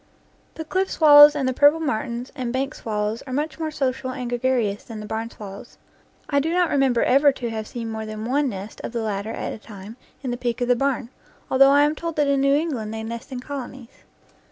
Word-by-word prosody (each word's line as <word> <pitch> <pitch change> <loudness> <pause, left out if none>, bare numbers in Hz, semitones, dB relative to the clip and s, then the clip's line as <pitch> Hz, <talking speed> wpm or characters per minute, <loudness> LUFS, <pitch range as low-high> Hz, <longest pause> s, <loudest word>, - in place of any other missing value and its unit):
The 320 - -6
cliff 375 +5 -1
swallows 295 -1 +8
and 275 -3 -1
the 260 - 0
purple 290 +4 +5
martins 240 -4 -3
and 250 -4 -3
bank 270 +3 -2
swallows 215 +1 -3
are - - -7
much 300 +4 -2
more 320 -1 -2
social 265 -3 -2
and 255 -1 -5
gregarious 240 -4 0
than 225 -2 -8
the 210 - -7
barn 220 +2 -4
swallows. 205 +1 -11 0.5
I 280 - +2
do 315 +4 -1
not 355 0 +2
remember 270 -4 +2
ever 280 +3 +5
to 240 -3 -5
have 220 -1 -5
seen 230 -2 -6
more 220 0 -5
than 215 0 -6
one 275 +3 +1
nest 200 0 -8
of - - -5
the 230 -1 -2
latter 205 0 -3
at - - -4
a - - -9
time 210 +1 -11 0.3
in 255 - -2
the 245 - -3
peak 240 -1 -2
of 245 0 -1
the 245 - +5
barn, 260 -2 -1 0.4
though 275 +1 +6
I 285 +1 +5
am 295 +1 +2
told 335 +1 -5
that 295 - +2
in 280 -1 +2
New 275 0 +4
England 280 -9 -2
they 220 0 -5
nest 230 +3 -7
in 250 -1 -5
colonies. 265 -3 -7
255 Hz, 230 wpm, -23 LUFS, 225-285 Hz, 0.5 s, swallows